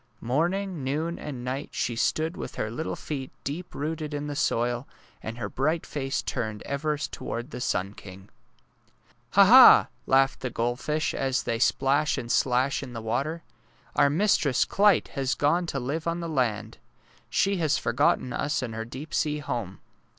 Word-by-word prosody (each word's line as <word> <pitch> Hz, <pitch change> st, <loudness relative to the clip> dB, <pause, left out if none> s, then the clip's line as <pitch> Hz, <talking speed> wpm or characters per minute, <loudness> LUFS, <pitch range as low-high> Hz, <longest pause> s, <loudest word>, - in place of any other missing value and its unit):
Morning, 170 Hz, +6 st, -1 dB
noon, 155 Hz, +6 st, -2 dB
and 130 Hz, -4 st, -6 dB
night 135 Hz, +3 st, -3 dB
she 120 Hz, -, -1 dB
stood 160 Hz, +8 st, 0 dB
with -, -, -7 dB
her 110 Hz, -, -3 dB
little 155 Hz, +8 st, -3 dB
feet 135 Hz, -4 st, -5 dB
deep 165 Hz, +6 st, -5 dB
rooted 155 Hz, 0 st, -3 dB
in 145 Hz, 0 st, -3 dB
the 145 Hz, -1 st, -4 dB
soil, 120 Hz, -1 st, 0 dB, 0.3 s
and 115 Hz, +1 st, -6 dB
her 120 Hz, -, -3 dB
bright 155 Hz, +5 st, -1 dB
face 135 Hz, -2 st, -3 dB
turned 110 Hz, -3 st, -3 dB
ever 150 Hz, +2 st, -2 dB
toward 125 Hz, -2 st, -5 dB
the 125 Hz, -, -6 dB
sun 95 Hz, -3 st, -1 dB
king. 95 Hz, -2 st, -11 dB
^' 95 Hz, -, -20 dB, 1.1 s
Ha! -, -, +8 dB
Ha! -, -, +9 dB
'' -, -, -39 dB
laugh 135 Hz, 0 st, +3 dB
the 125 Hz, -, -3 dB
goldfish, 125 Hz, +7 st, -1 dB
as 130 Hz, -3 st, 0 dB
they 115 Hz, +1 st, -2 dB
splash 140 Hz, +4 st, +2 dB
and 120 Hz, 0 st, -4 dB
slash 130 Hz, +2 st, +2 dB
in 130 Hz, -3 st, -8 dB
the 115 Hz, -, -5 dB
water. 155 Hz, +9 st, -2 dB, 0.3 s
" -, -, -32 dB
Our 140 Hz, -, +5 dB
mistress, 150 Hz, -, +2 dB
Clyte, 200 Hz, -3 st, +3 dB
has 135 Hz, -1 st, -1 dB
gone 170 Hz, +4 st, +1 dB
to 140 Hz, -, -2 dB
live 145 Hz, +6 st, -3 dB
on 170 Hz, +1 st, -1 dB
the 170 Hz, -, -4 dB
land. 115 Hz, -7 st, -1 dB, 0.5 s
She 195 Hz, +10 st, +1 dB
has 155 Hz, -4 st, +1 dB
forgotten 125 Hz, +1 st, +1 dB
us 145 Hz, -2 st, -1 dB
and 115 Hz, -3 st, -4 dB
her 110 Hz, 0 st, -4 dB
deep 130 Hz, +6 st, -9 dB
sea 150 Hz, -1 st, +1 dB
home. 115 Hz, -10 st, -5 dB
135 Hz, 180 wpm, -26 LUFS, 120-155 Hz, 1.1 s, Ha